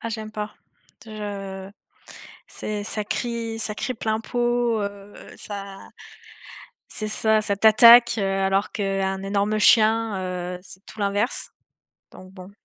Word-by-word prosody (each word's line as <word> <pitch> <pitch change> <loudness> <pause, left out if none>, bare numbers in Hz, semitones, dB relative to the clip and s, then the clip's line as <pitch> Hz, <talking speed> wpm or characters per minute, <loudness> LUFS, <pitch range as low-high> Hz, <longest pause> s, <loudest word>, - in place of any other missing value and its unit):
Ah, 230 - -5
j'aime 220 -1 -6
pas. 210 0 -6 0.5
Je 200 -3 -7 0.8
c'est 210 -1 -5
ça 210 -1 0
crie 225 +1 -4
ça 215 -1 +2
crie 255 - -3
plein 220 -1 -2
pot, 240 -1 0
heu, 200 0 -7 0.2
ça 200 -1 -7 1.1
c'est 215 0 -1
ça, 220 0 +2
ça 205 -2 0
t'attaque, 235 +3 +7
heu, - - -1
alors 195 +1 0
qu'un 195 -1 -2
énorme 200 +2 -1
chien, 220 -1 +4
heu, 180 -1 -5
c'est 190 +1 -8
tout - - -14
l'inverse. 205 +4 0 0.6
Donc 185 0 -14
bon. 185 +1 -12
210 Hz, 135 wpm, -23 LUFS, 195-220 Hz, 1.1 s, t'attaque